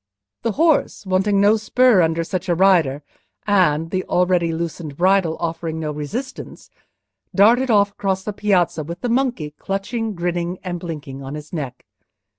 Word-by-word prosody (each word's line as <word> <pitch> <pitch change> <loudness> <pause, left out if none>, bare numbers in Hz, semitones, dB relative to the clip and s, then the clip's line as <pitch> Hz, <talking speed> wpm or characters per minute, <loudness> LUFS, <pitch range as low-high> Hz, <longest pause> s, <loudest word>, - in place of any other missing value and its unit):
The 230 - -1
horse 315 -6 +1
wanted 190 +2 +1
no 205 +2 +4
spur 240 -1 +4
under 165 0 +1
such 185 +2 -4
a 175 - +3
rider, 165 -7 +3 0.4
and, 165 -6 +2
the 185 -1 -1
already 180 -2 +1
loosened 165 -3 -5
bridle 185 -2 +2
offering 165 -1 -3
no 155 -1 -3
resistance, 215 - -6 0.6
darted 235 +6 +5
off 200 -2 +4
across 190 -1 -2
the 210 - -4
piazza, 185 -6 +1
with 170 +3 -7
the 245 - -2
monkey, 240 - 0
clutching, 210 +3 -3
grinning, 175 +1 -2
and 175 -2 -4
blinking, 150 -6 -7
on 135 +2 -6
his 150 +2 -10
neck. 135 -6 -5
180 Hz, 155 wpm, -20 LUFS, 160-205 Hz, 0.6 s, darted